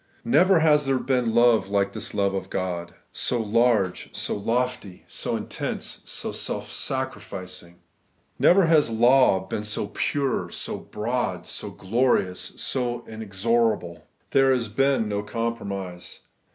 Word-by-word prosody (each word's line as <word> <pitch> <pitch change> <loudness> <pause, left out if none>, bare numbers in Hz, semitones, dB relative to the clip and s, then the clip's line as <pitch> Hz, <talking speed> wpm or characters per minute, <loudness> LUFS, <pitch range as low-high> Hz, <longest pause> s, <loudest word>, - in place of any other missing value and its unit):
Never 170 +7 +5
has 150 -3 +4
there 135 -1 +2
been 125 -3 0
love 115 -5 +4
like 100 -1 +1
this - - -6
love 100 -1 +1
of 95 - -4
God; 85 -2 -3 0.2
so 120 - 0
large, 110 -3 +1
so - - 0
lofty, 115 -3 -2
so - - -3
intense, - - -4
so - - -2
self - - -2
sacrificing. 90 -1 -4 0.6
Never 185 +1 +6
has 155 -5 +4
law 120 -3 +4
been 105 +2 -4
seen 105 0 -2
so - - -12
pure, 140 -3 -1
so - - -5
broad, 105 -5 -3
so 105 - -6
glorious, 100 -2 +1
so 120 -2 -2
inexorable. 110 -3 -1 0.2
There 135 -1 +5
has 120 -4 0
been 135 0 +2
no 100 -1 -1
compromise. 100 -5 -4
115 Hz, 135 wpm, -25 LUFS, 100-125 Hz, 0.6 s, Never